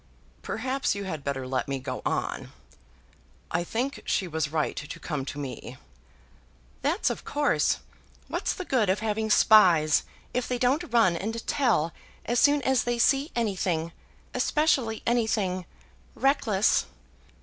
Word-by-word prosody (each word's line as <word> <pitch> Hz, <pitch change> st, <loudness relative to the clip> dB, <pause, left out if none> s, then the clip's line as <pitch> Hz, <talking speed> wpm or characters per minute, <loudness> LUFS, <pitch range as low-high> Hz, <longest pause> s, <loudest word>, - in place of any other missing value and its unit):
"Perhaps 260 Hz, +1 st, -1 dB
you 200 Hz, -, -4 dB
had 160 Hz, -7 st, -5 dB
better 135 Hz, -2 st, -3 dB
let 130 Hz, +2 st, -2 dB
me 140 Hz, -1 st, -2 dB
go 130 Hz, -1 st, -5 dB
on. -, -, -3 dB, 1.0 s
I 175 Hz, -, 0 dB
think 250 Hz, +9 st, -3 dB
she 190 Hz, -, 0 dB
was 160 Hz, -2 st, -2 dB
right 155 Hz, -2 st, 0 dB
to 145 Hz, -, -7 dB
come 150 Hz, -5 st, -4 dB
to 145 Hz, -, -6 dB
me." 130 Hz, -3 st, -6 dB, 1.0 s
"That's 325 Hz, +8 st, +1 dB
of -, -, -6 dB
course. 290 Hz, 0 st, +1 dB, 0.5 s
What's -, -, -2 dB
the 370 Hz, -, -6 dB
good 235 Hz, -, +1 dB
of 190 Hz, +3 st, +1 dB
having 220 Hz, 0 st, -1 dB
spies, 175 Hz, -9 st, +6 dB, 0.3 s
if 250 Hz, 0 st, -1 dB
they 250 Hz, -, -1 dB
don't 275 Hz, +7 st, +1 dB
run 225 Hz, -7 st, +4 dB
and 225 Hz, +6 st, -4 dB
tell 220 Hz, -, +1 dB, 0.3 s
as 240 Hz, +1 st, +1 dB
soon 290 Hz, -1 st, +4 dB
as 265 Hz, 0 st, +2 dB
they 240 Hz, 0 st, -1 dB
see 275 Hz, +5 st, +3 dB
anything, 185 Hz, -7 st, -1 dB, 0.4 s
especially 265 Hz, -8 st, +1 dB
anything 210 Hz, -6 st, 0 dB, 0.5 s
reckless." 225 Hz, -7 st, +2 dB
215 Hz, 140 wpm, -27 LUFS, 160-250 Hz, 1.0 s, spies